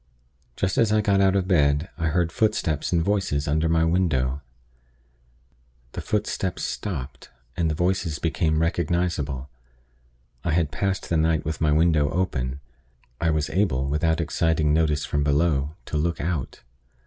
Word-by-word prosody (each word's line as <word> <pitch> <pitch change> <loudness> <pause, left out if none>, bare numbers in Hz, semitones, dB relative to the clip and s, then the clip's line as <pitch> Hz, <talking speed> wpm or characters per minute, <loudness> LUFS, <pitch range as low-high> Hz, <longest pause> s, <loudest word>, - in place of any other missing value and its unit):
Just 95 0 0
as 115 -2 +3
I 110 - +4
got 100 -2 +2
out 95 0 +3
of 95 -2 +1
bed, 75 -3 +2
I 80 -1 -1
heard 85 +1 +1
footsteps 85 -9 0
and 85 -2 +2
voices 95 -8 0
under 80 +2 +1
my 80 0 +3
window. 75 -6 +1 1.5
The - - -5
footsteps 100 -3 -2
stopped, 70 -10 -5 0.3
and 85 -2 0
the 80 - -1
voices 85 -2 0
became 80 -1 0
recognizable. 80 -6 -1 1.0
I 85 - 0
had 80 -3 +1
passed 95 +6 -2
the 85 - +1
night 80 0 +1
with 80 +2 -3
my 75 -1 +3
window 75 -2 +3
open; 70 -7 -2 0.6
I 85 - +1
was 75 -2 0
able, 80 -9 +1
without 80 +3 +1
exciting 80 -1 +1
notice 75 -2 +1
from 75 0 -1
below, 75 0 +1
to 75 - -3
look 85 +3 -1
out. 80 -4 -3
80 Hz, 150 wpm, -24 LUFS, 75-90 Hz, 1.5 s, I